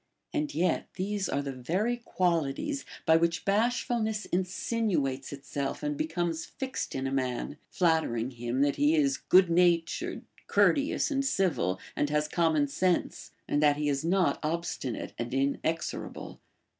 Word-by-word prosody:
And 300 -2 -1
yet 180 +2 +1
these 195 0 -2
are 140 - 0
the 140 - -3
very 180 - -1
qualities 180 - -1 0.2
by 160 - +6
which 170 +1 0
bashfulness 220 0 +1
insinuates 180 - -1
itself 140 0 -4
and 150 0 -1
becomes 165 +1 -1
fixed 265 -2 -5
in 135 0 -2
a 135 - -1
man, 130 +1 -2
flattering 160 -9 +1
him 120 +1 -2
that 140 0 +2
he 295 +2 +4
is 280 -3 +2
good 185 -1 +4
natured, 170 -1 +2 0.2
courteous, 285 +1 +2
and 275 -1 +1
civil, 175 - +1 0.2
and 145 - 0
has 150 0 +1
common 160 -3 +2
sense, 175 +5 0 0.2
and 145 - +1
that 145 -1 +4
he 150 0 0
is 140 0 0
not 180 +2 +2
obstinate 155 -6 -3
and 120 +2 -3
inexorable. 140 +4 -2
165 Hz, 145 wpm, -29 LUFS, 140-195 Hz, 0.2 s, by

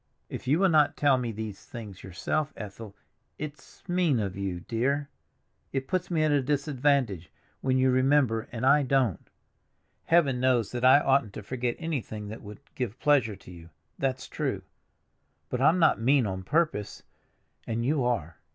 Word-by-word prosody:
"If - - -7
you 145 +4 +4
will 190 +1 +4
not 155 -3 +3
tell 140 -3 +3
me 120 -2 -2
these 110 -2 -7
things 105 -5 -9
yourself, 115 - -2
Ethel—it's 110 - -11
mean 175 -8 +2
of 100 -3 -3
you, 95 -3 -3
dear; 140 - -1 0.6
it 135 -1 -3
puts 180 -1 -1
me 165 -3 +1
at 155 - +2
a 145 -1 +3
disadvantage 135 - 0 0.3
when 130 -1 +1
you 130 0 +3
remember 130 -3 +2
and 115 +1 -3
I 145 +2 +6
don't. 130 - 0 0.8
Heaven 145 -7 +3
knows 125 -4 +2
that 120 0 -4
I 130 +2 +8
oughtn't 135 -8 +2
to - - -7
forget 120 +2 -2
anything 120 -10 -4
that 110 - -8
would 105 +4 -11
give 125 -2 -4
pleasure 135 -8 +3
to 95 -1 -14
you—that's 85 - -6
true; - - -3 0.9
but 125 - -2
I'm 155 +6 +5
not 160 -9 +3
mean 130 +1 +3
on 95 -2 -3
purpose, 150 - -1 0.6
and 115 0 -2
you 140 0 +1
are. 105 -10 -1
130 Hz, 160 wpm, -28 LUFS, 105-145 Hz, 0.9 s, I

